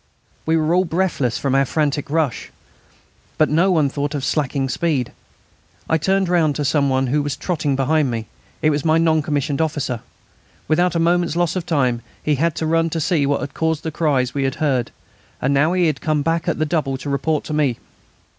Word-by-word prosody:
We 160 0 +3
were 160 +1 +1
all 180 +1 +4
breathless 165 -9 0
from 135 -2 -1
our 135 0 +4
frantic 145 +1 -1
rush. 155 -5 -1 0.9
But 155 -3 +2
no 170 +5 +3
one 160 -6 +3
thought 145 +2 -3
of 135 -2 -2
slackening 140 -2 0
speed. 135 -2 -1 0.8
I 160 - +2
turned 190 +4 +1
round 165 -4 +2
to 145 - -2
some 140 0 +2
one 130 0 +1
who 145 +4 +1
was 145 -1 -2
trotting 150 -3 -1
behind 145 +1 +1
me. 115 -2 -3 0.4
It 155 - +4
was 145 -1 -1
my 160 0 +3
non 160 -1 +3
commissioned 145 0 -1
officer. 145 -6 -1 0.7
Without 175 +3 +2
a - - +2
moment's 170 0 +1
loss 175 0 +1
of 180 -2 -3
time 130 -7 +1 0.2
he 150 - +1
had 155 +3 0
run 165 +1 +2
to 165 - -2
see 160 -3 +1
what 145 - 0
had 140 - -5
caused 160 -1 -1
the 160 - -3
cries 140 -6 0
we 140 - -1
had 135 - -1
heard, 135 -6 0 0.5
and 135 +2 +1
now 150 +5 +3
he 180 -1 +2
had 155 -4 0
come 155 -3 0
back 165 +2 -1
at 170 - 0
the 155 - +1
double 145 -4 -1
to 140 - -8
report 145 +2 0
to 155 - -5
me. 145 -6 +1
150 Hz, 210 wpm, -20 LUFS, 140-165 Hz, 0.9 s, all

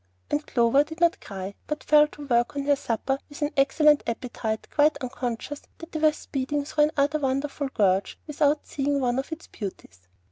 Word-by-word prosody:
And 295 +1 +1
Clover 240 +3 +4
did 320 +2 -10
not 340 -1 +3
cry, 195 0 -6
but 300 0 -3
fell 300 0 +6
to 295 -1 -10
work 240 0 +1
on 280 - -1
her 285 0 +3
supper 270 +2 -2
with 290 +1 -5
an 295 - 0
excellent 295 +2 +4
appetite, 230 -2 -3
quite 300 +1 +3
unconscious 255 +2 -4 0.2
that 330 0 -11
they 315 - -3
were 310 0 +5
speeding 285 -1 -3
through 300 0 +2
another 290 +2 +2
wonderful 275 +1 -1
gorge 195 -6 +1
without 295 0 +1
seeing 280 0 -1
one 250 -1 +1
of 270 - -5
its 320 +1 -6
beauties. 90 - -9
280 Hz, 185 wpm, -26 LUFS, 245-295 Hz, 0.2 s, fell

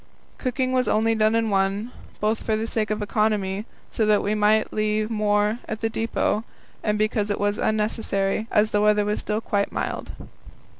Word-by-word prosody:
Cooking 255 0 -1
was 255 -1 +2
only 225 +1 +2
done 215 0 +2
in 225 -1 +1
one, 195 +4 0 0.3
both 215 +1 0
for 220 - 0
the 220 +1 -1
sake 220 -2 -1
of 215 0 -1
economy, 210 -1 0 0.2
so 225 - 0
that 210 -1 +3
we 205 - 0
might 215 +1 +2
leave 215 +1 0
more 210 +1 +1
at 220 - -5
the 225 0 0
depot, 225 -1 0 0.4
and 210 -1 +1
because 215 0 0
it 205 - -1
was 205 0 0
unnecessary, 215 -1 0
as 215 +1 +2
the 205 - +2
weather 210 0 +3
was 210 0 -1
still 215 +1 -2
quite 200 -2 -1
mild. - - -3
215 Hz, 185 wpm, -24 LUFS, 210-220 Hz, 0.4 s, that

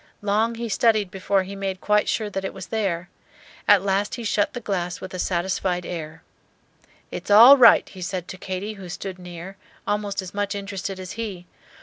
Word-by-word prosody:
Long 215 +3 +1
he 235 +1 -4
studied 215 -3 +2
before 195 0 0
he 195 +2 -8
made 195 -1 -3
quite 210 +1 +2
sure 215 - 0
that 195 -1 -4
it 190 - -5
was 190 -1 -7
there. 185 -5 -1 0.6
At 205 -2 +6
last 200 +2 0
he 240 - -7
shut 205 -1 +1
the 245 - -4
glass 180 -6 -3
with 185 - -8
a 185 - -5
satisfied 180 0 -1
air. 160 -2 -6 0.9
"It's - - -7
all 230 +7 +10
right," 245 -4 +7
he 185 - -12
said 180 0 -4
to 190 - -7
Katy, 190 +3 -4
who 195 -3 -10
stood 185 +1 -6
near, 180 +2 -9 0.3
almost 205 -1 -2
as 185 -2 -5
much 205 0 -2
interested 195 -1 -5
as 185 -1 -7
he. 205 -6 -6
195 Hz, 195 wpm, -23 LUFS, 185-210 Hz, 0.9 s, all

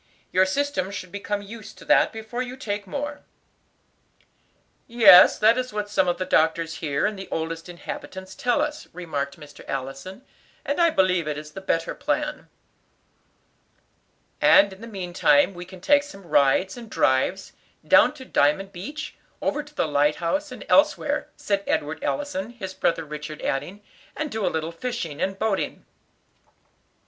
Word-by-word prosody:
"Your 185 +1 +4
system 285 -3 -1
should 185 -3 -7
become 205 0 -3
used 215 +1 -10
to - - -13
that - - +4
before 225 +2 -5
you 255 +1 -5
take 205 -5 -4
more." 290 +6 -4 1.7
"Yes, 230 -6 +8
that 225 +3 +4
is 255 0 -3
what 210 -1 -3
some 190 - +2
of 175 - +1
the 185 - -2
doctors 165 -1 +1
here, 145 -3 -1
and 210 -2 -2
the 190 - -7
oldest 165 +1 -4
inhabitants, 190 +2 -8
tell 275 +1 +1
us," 300 0 -5
remarked 145 -5 -4
Mr. 150 -1 -13
Allison, 135 - -5 0.4
"and 285 +4 0
I 335 - +6
believe 185 - +2
it 150 -1 -2
is 150 0 -8
the 195 - -8
better 165 -3 -1
plan." 300 0 -2 1.9
"And 200 -1 +6
in 190 - -15
the 230 - -8
meantime 180 -6 +2
we 175 0 -8
can 185 0 -13
take 285 +7 +5
some 240 -10 -12
rides 145 +5 +3
and 235 -2 -10
drives, 175 +8 +1 0.3
down - - +6
to 265 -3 -10
Diamond 150 - +1
Beach, 290 - -6 0.3
over 295 - -1
to 295 +1 -16
the - - +1
light 145 0 +2
house, 290 - -2
and - - -9
elsewhere," - - +2
said 200 -1 -1
Edward 150 +2 -1
Allison, 260 -9 -2
his 200 -6 -7
brother 165 -3 0
Richard 150 0 -7
adding, 185 +10 -3 0.3
"and 305 -2 -3
do 220 -2 -1
a - - +3
little 160 +1 -3
fishing 170 - -5
and 195 0 -1
boating." 215 -1 -2
190 Hz, 160 wpm, -24 LUFS, 165-240 Hz, 1.9 s, Yes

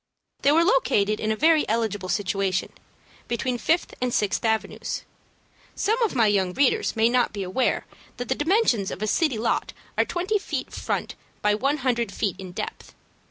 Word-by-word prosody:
They 280 - +4
were 325 +3 +5
located 215 - +2
in 215 - 0
a - - +1
very 315 +5 +4
eligible 210 -4 -1
situation, 195 -2 -1 0.5
between 240 +1 -1
Fifth 330 +7 +1
and 250 -1 0
Sixth 210 -1 0
Avenues. 220 -1 -1 0.7
Some 450 +4 0
of 445 - +1
my 235 -3 +4
young 195 -3 +2
readers 275 0 +2
may 225 0 +4
not 245 0 +2
be 200 -2 -3
aware 190 +8 0 0.3
that 245 - -4
the - - +2
dimensions 295 - +2
of 210 - -5
a - - +2
city 265 +3 +1
lot 225 - -1 0.3
are - - +6
twenty 370 +4 -1
five - - -14
feet - - -4
front - - -3 0.3
by 210 0 +4
one 275 +8 +1
hundred 235 -4 +1
feet 195 -1 -2
in 185 -2 -7
depth. - - -6
235 Hz, 180 wpm, -25 LUFS, 205-295 Hz, 0.7 s, are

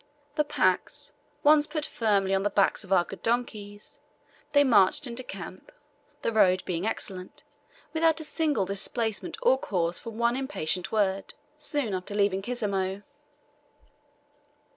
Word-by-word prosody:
The 300 - +2
packs 295 - 0 0.3
once 295 0 +6
put 305 -1 -2
firmly 200 -4 +1
on 195 - +2
the 205 - +1
backs 200 +1 +2
of 195 - -13
our 185 -2 +5
good - - -10
donkeys, 215 -3 -3 0.5
they 285 -1 +5
marched 215 0 +4
into 240 0 -3
camp 380 - -9 0.5
the - - +1
road 185 -4 +4
being 180 +3 -2
excellent 185 -4 -5 0.5
without 325 0 +3
a - - -5
single 300 - 0
displacement 220 - -1
or - - +4
cause 170 -3 0
for - - -7
one 235 +2 0
impatient 190 - -2
word, 195 -3 0 0.2
soon 290 -7 -2
after 185 +2 -3
leaving 200 -2 +2
Kisemo. 200 -4 -2
215 Hz, 140 wpm, -27 LUFS, 195-275 Hz, 0.5 s, once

